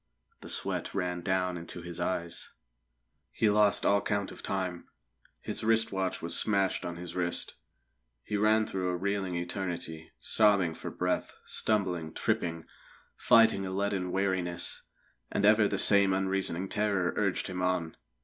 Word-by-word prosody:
The - - -11
sweat - - -2
ran 90 -2 -1
down 90 0 0
into 85 +1 -7
his 85 0 -7
eyes. 85 -1 -3 0.8
He 110 - +2
lost 105 -1 +3
all 100 0 +4
count 100 0 -1
of - - -11
time; 90 -3 -3 0.5
his - - -4
wrist 115 0 +3
watch 95 -3 -2
was 85 - +1
smashed 100 -3 +2
on 85 -1 -4
his 85 0 -8
wrist. 85 -1 -1 0.7
He 105 - -4
ran 110 +1 +3
through 95 -3 -2
a 90 - -1
reeling 95 -1 -2
eternity, 85 -2 -4
sobbing 100 -6 +3
for - - -7
breath, 90 0 -2
stumbling, 90 -7 -1
tripping, 85 -1 -1 0.5
fighting 115 -4 +5
a 95 - -3
leaden 95 -1 -1
weariness; 95 -3 -1 0.5
and 100 - +1
ever 105 0 +6
the - - -2
same 100 -2 +5
unreasoning 95 -1 -1
terror 100 -3 0
urged 100 -3 0
him 90 -1 -4
on. 90 -3 -1
95 Hz, 150 wpm, -30 LUFS, 90-100 Hz, 0.8 s, ever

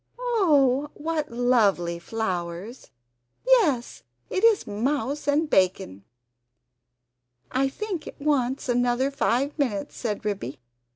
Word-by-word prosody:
"Oh, 295 - +2
what 310 0 -2
lovely 215 -8 +2
flowers! 185 +2 -4 0.6
Yes, 360 - +2 0.3
it 375 - -1
is 455 -3 +4
mouse 270 +7 -2
and 295 +2 +2
bacon!" 185 - +1 1.5
"I 270 +1 +1
think 380 +1 -5
it - - -10
wants 275 -3 0
another 245 +2 +1
five 275 0 0
minutes," 215 -9 -1
said 215 -2 -4
Ribby. 190 - -3
255 Hz, 105 wpm, -25 LUFS, 210-295 Hz, 1.5 s, is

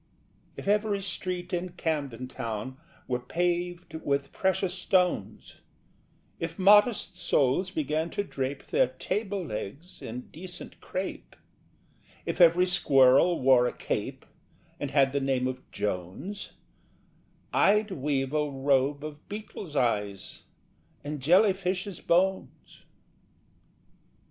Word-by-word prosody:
If - - -8
every 205 0 +2
street 180 -1 -2
in 175 0 -2
Camden 140 -8 -3
Town 115 +1 -5 0.3
Were 125 -1 -1
paved 175 +5 -2
with 140 0 -1
precious 190 -1 0
stones, 180 - 0 0.8
If 165 0 -4
modest 205 0 +4
souls 150 +2 +2
began 155 -1 -1
to 205 - +2
drape 135 -6 -4
Their - - +3
table 200 -3 -3
legs 125 - -7
in 120 +3 -6
decent 175 +3 -9
crape, 185 +1 -5 0.9
If - - -1
every 175 +1 +7
squirrel 145 -1 +5
wore 125 -2 +5
a - - -3
cape - - -4 0.5
And 145 - -3
had 135 -1 +3
the 140 0 0
name 135 -2 +1
of 130 0 -3
Jones, 100 - -4 1.0
I'd 210 +1 +3
weave 135 -3 -1
a 150 -1 +1
robe 140 +1 +1
of 150 -1 -10
beetles' 205 -6 -7
eyes 105 -6 -1 0.6
And 145 +1 -4
jellyfishes' 185 +2 +2
bones. 190 +2 -1
160 Hz, 110 wpm, -28 LUFS, 135-185 Hz, 1.0 s, every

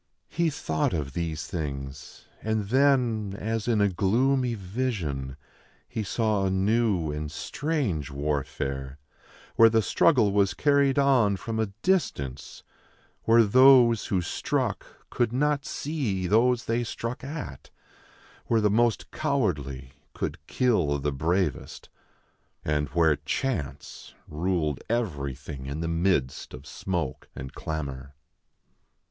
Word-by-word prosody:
He 170 0 +1
thought 80 - -1
of 70 -5 -3
these 80 -2 -3
things; 70 -5 -6 0.2
and 110 -2 -1
then, 120 -6 +2
as 110 +1 -2
in 115 -3 +2
a 100 - +5
gloomy 120 +7 +1
vision, 90 - -3 0.5
he 110 - -4
saw 105 -1 0
a 95 - +1
new 95 -3 +1
and 75 0 -4
strange 100 - -2
warfare, 70 -1 -3 0.6
where 115 0 +8
the 110 -1 +2
struggle 110 - +3
was 100 -1 +2
carried 140 0 +3
on 125 -8 +4
from 110 +2 -4
a 110 - +1 0.2
distance, 70 - -1 0.6
where 115 +1 +6
those 125 0 +6
who 95 -3 0
struck 85 - -2 0.2
could 120 -2 +1
not 145 +3 0
see 130 - -2
those 120 +5 +3
they 115 +1 0
struck 115 +2 -5
at, 135 - -7 0.8
where 115 - +3
the 105 -2 +2
most 115 +1 +1
cowardly 70 - -1 0.2
could - - -3
kill 90 - +2
the 75 +1 -1
bravest, 85 +7 -2 0.8
and 75 -1 0
where 80 -4 +3
chance 75 - -4
ruled 80 -2 -1
everything 70 - -3
in 70 +3 -4
the 85 - -2
midst 85 -8 0
of 65 +3 -12
smoke 85 -5 -4
and 65 0 -7
clamor. 70 -3 -5
95 Hz, 120 wpm, -27 LUFS, 75-120 Hz, 0.8 s, where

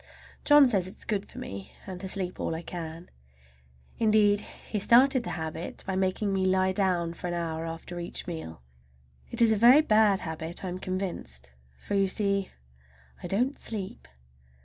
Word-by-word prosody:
John 290 -2 +8
says 195 -7 +1
it 190 - -8
is - - -3
good 205 -3 -2
for - - -12
me, 100 0 -7
and 185 -2 -7
to 190 - -4
sleep 185 -1 -3
all 160 - -2
I 165 - -6
can. 165 0 -7 0.9
Indeed, 215 -2 +4
he 210 +1 -6
started 250 +4 +5
the - - -5
habit 160 +1 -5
by 190 - -2
making 190 +2 0
me 190 -1 +1
lie 190 0 +2
down 180 -3 +1
for 175 - -6
an 175 - -2
hour 165 -1 -3
after 165 +2 -7
each 170 - -5
meal. 160 - -7 0.7
It - - +2
is 225 - +5
a - - +4
very 245 +7 +7
bad 215 -7 +3
habit, 160 +2 -5
I - - -2
am 180 +1 -5
convinced, 170 - -5 0.3
for, - - -6
you 195 -1 +3
see, 200 0 0 0.7
I - - -5
don't 250 +8 0
sleep. 200 -4 -6
190 Hz, 180 wpm, -28 LUFS, 170-210 Hz, 0.9 s, John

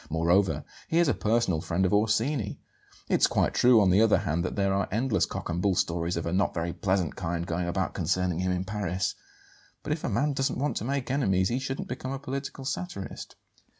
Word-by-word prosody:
Moreover, 85 +5 +2 0.2
he 165 - 0
is 170 -1 +4
a 140 - +3
personal 105 -7 +1
friend 90 +4 0
of 95 - +1
Orsini. 110 +2 +1 0.5
It's - - +4
quite - - +1
true, 120 -2 +6
on 95 -3 +4
the 95 +4 +5
other 110 -1 +5
hand, 85 -3 -1
that 95 - -3
there 100 -1 +1
are 100 0 0
endless 115 +4 +1
cock - - -5
and 85 +1 -2
bull 100 -1 +2
stories 85 -1 0
of 85 - -3
a 85 - -2
not 95 +1 +1
very 85 0 -2
pleasant 95 -5 0
kind 85 -1 -3
going 85 +1 -2
about 95 +2 -1
concerning 90 0 0
him 95 0 0
in 90 +1 -1
Paris; 95 -3 -2 0.7
but 150 - -1
if 155 - -6
a - - -1
man 145 0 +1
doesn't 135 0 -1
want 145 +3 -1
to 110 - -3
make 135 -1 -2
enemies 95 -9 +2
he 125 - 0
shouldn't 135 0 -4
become 130 +1 -5
a - - -3
political 135 0 -5
satirist." 140 - -5
100 Hz, 215 wpm, -28 LUFS, 90-130 Hz, 0.7 s, true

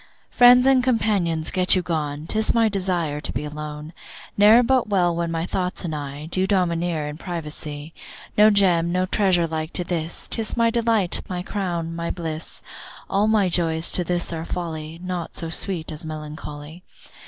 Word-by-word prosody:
Friends 250 +1 +7
and 265 -2 +4
companions 205 -10 +1
get 185 0 +4
you 185 - 0
gone, 150 -3 -3
'Tis 220 +7 +2
my 230 -1 +4
desire 180 -7 -1
to - - -4
be 150 - -4
alone; 150 +1 -7 0.4
Ne'er 215 +4 +7
well 255 0 +2
but 180 -4 +2
when 170 0 -1
my 165 0 -2
thoughts 180 0 -3
and 160 - -3
I 145 0 -6
Do 185 +3 -1
domineer 170 -5 0
in 150 +1 -7
privacy. 155 -3 -6 0.4
No 210 +1 +7
Gem, 180 -5 +3
no 185 +1 +1
treasure 185 -3 +2
like 160 0 -4
to 180 - -1
this, 170 -2 -3
'Tis 225 0 -3
my 230 -1 +3
delight, 230 -6 +1
my 180 -1 -3
crown, 175 -5 -3
my 170 0 -3
bliss. 160 -2 -6 0.5
All 200 +2 +2
my 215 -3 +3
joys 165 -2 +2
to 180 - 0
this 175 0 -1
are 160 -1 -4
folly, 165 -2 -5
Naught 180 -2 -4
so 165 - -3
sweet 165 -1 -3
as 155 +1 -5
melancholy. 155 +1 -8
175 Hz, 175 wpm, -23 LUFS, 160-195 Hz, 0.5 s, Friends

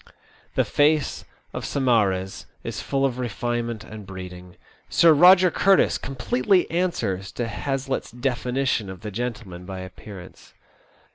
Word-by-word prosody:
The - - +3
face 150 0 +1 0.3
of - - -5
Saumarez 105 -8 0 0.2
is - - -4
full 135 -1 0
of 130 -2 -1
refinement 120 -1 -2
and 110 -1 -9
breeding. 90 -1 -9 0.3
Sir 165 -1 +6
Eoger 180 +3 +7
Curtis 195 -1 +4
completely 135 +7 +1
answers 110 - -1
to 120 - -2
Hazlitt's 135 +4 -3
definition 125 -2 -1
of 95 -1 -9
the 105 -1 -6
gentle 115 -1 -4
man 90 0 -9
by 95 0 -6
appearance. 95 0 -11
120 Hz, 130 wpm, -24 LUFS, 95-135 Hz, 0.3 s, Eoger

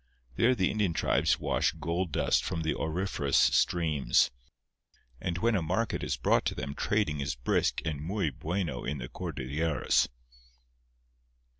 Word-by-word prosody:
There 125 - +4
the 95 -4 +1
Indian 105 -5 0
tribes 75 +1 +2
wash - - +1
gold 85 +2 -2
dust - - +2
from 80 - -3
the 80 - 0
auriferous 80 -4 -1
streams; 75 +4 +3 0.9
and 85 -2 -2
when 115 +6 +2
a 95 - +1
market 95 +8 -1
is - - -1
brought - - +2
to - - -1
them 70 - -4
trading 100 -5 0
is 70 0 -2
brisk - - 0
and 75 -3 -2
muy 90 -1 -1
bueno 85 +5 -3
in 75 +2 -3
the 65 -2 -6
Cordilleras. 70 +2 0
80 Hz, 145 wpm, -29 LUFS, 70-95 Hz, 0.9 s, There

